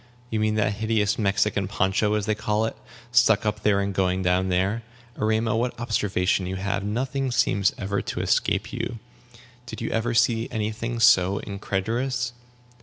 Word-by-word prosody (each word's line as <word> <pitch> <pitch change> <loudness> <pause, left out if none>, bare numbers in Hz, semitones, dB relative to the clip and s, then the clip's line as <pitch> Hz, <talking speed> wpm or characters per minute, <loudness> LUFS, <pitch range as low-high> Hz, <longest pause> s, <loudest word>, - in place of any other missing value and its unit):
You 110 - 0
mean 110 0 +1
that 110 -1 +1
hideous 110 -1 0
Mexican 100 -1 +1
poncho, 100 +2 +1
as 105 -2 -1
they 110 - +1
called 105 +1 0
it, - - -15 0.3
stuck 115 -4 +4
up 105 0 -2
here, 100 -2 +3
and 100 0 -1
going 95 -1 0
down 90 +1 +1
there. 95 +5 +1 0.3
Erema, 110 +1 +1
what 120 +2 -1
observation 100 -5 0
you 95 - -3
have! 95 +1 -2
Nothing 130 +6 -2
ever 130 - -1
seems 100 -4 +2
to 100 0 -3
escape - - 0
you. 120 - -3 0.7
Did - - -7
you 115 - -3
ever 115 +1 0
see 115 0 +2
any 110 -2 -2
thing 115 +2 -4
so 95 -3 +5
indecorous?" 115 +6 -2
105 Hz, 170 wpm, -25 LUFS, 100-115 Hz, 0.7 s, so